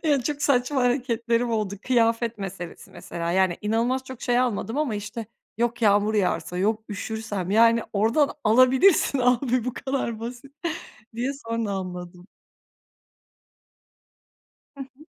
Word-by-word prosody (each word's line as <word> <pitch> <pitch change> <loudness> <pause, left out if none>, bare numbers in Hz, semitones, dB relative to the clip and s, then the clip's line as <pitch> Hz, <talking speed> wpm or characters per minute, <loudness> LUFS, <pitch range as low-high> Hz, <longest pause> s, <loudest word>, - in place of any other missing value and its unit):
Ya, 285 -5 +2
çok 290 +2 -3
saçma 275 0 +2
hareketlerim 240 -1 +1
oldu, 215 -3 -1
kıyafet 230 -2 +2
meselesi 180 -3 -7
mesela, 170 0 -5
yani 190 -2 +2
inanılmaz 235 +5 0
çok 260 -2 -10
şey 245 0 +2
almadım 235 0 -1
ama 275 -8 0
işte, 210 +2 -5 0.3
yok. 240 0 -1
"Yağmur 205 +1 +3
yağarsa...", 180 -3 0
yok, 215 +3 0
"Üşürsem...", 205 -2 -4
yani, 230 +2 +5
oradan 230 +8 +2
alabilirsin 260 - +5
abi, 250 -1 +2
bu 250 - -2
kadar 260 -5 -3
basit, 245 +4 -8 0.6
diye 245 +4 -1
sonra 230 -5 -3
anladım. 180 -1 -6 2.5
Hı - - -6
hı. 270 +4 -19
230 Hz, 125 wpm, -25 LUFS, 205-255 Hz, 2.5 s, yani